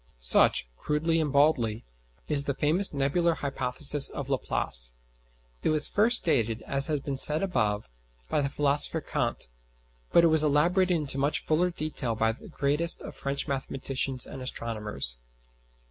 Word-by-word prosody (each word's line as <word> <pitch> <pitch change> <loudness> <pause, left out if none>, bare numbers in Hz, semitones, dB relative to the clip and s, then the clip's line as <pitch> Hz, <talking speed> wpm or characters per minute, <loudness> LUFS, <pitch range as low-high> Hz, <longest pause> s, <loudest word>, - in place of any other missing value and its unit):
Such, - - +3
crudely 160 - -1
and 150 -3 -2
baldly, 130 -7 +1 0.4
is 145 -2 0
the 140 - -2
famous 165 +8 +1
nebular 160 +5 0
hypothesis 140 +1 +1
of 140 -1 -7
Laplace. - - -1 0.7
It - - -1
was 155 -1 +3
first 225 +4 +4
stated, 115 -8 0
as 135 0 -1
has 150 -3 -2
been 135 -1 -5
said 155 +5 +6
above, 105 - -1 0.4
by - - -1
the 140 - -2
philosopher 145 +1 +3
Kant, - - -4 0.6
but 170 - +5
it - - +5
was 160 - +7
elaborated 175 +5 +1
into 140 -3 -2
much 145 +2 -1
fuller 170 +3 +1
detail 150 -8 -4
by 110 0 0
the 115 - -13
greatest 150 +5 0
of - - -9
French 140 0 -4
mathematicians 135 -1 -3
and 135 - -10
astronomers. 105 - -3
140 Hz, 150 wpm, -27 LUFS, 125-155 Hz, 0.7 s, was